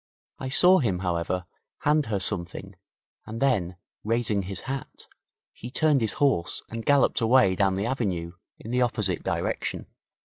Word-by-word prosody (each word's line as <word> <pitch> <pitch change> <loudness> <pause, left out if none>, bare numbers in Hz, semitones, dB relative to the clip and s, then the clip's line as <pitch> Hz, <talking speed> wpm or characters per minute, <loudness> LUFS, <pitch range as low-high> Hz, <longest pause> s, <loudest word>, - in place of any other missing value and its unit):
I 130 - -4
saw 180 +7 +6
him, 105 -9 0
however, 85 +1 -2 0.4
hand 150 0 +2
her 105 -3 -1
something, 95 +1 -3 0.5
and 110 +1 -6
then, 100 -10 +1 0.3
raising 110 -2 0
his 95 0 -3
hat, 135 0 -7 0.5
he 120 - -9
turned 145 +1 +2
his 110 -2 0
horse 135 -12 0
and 115 0 -5
galloped 140 -2 +3
away 115 -4 +4
down 95 0 +1
the 100 +2 -2
avenue 95 -10 -2 0.3
in 115 - -9
the 125 +1 +1
opposite 105 -6 +1
direction. - - -3
110 Hz, 150 wpm, -26 LUFS, 95-130 Hz, 0.5 s, saw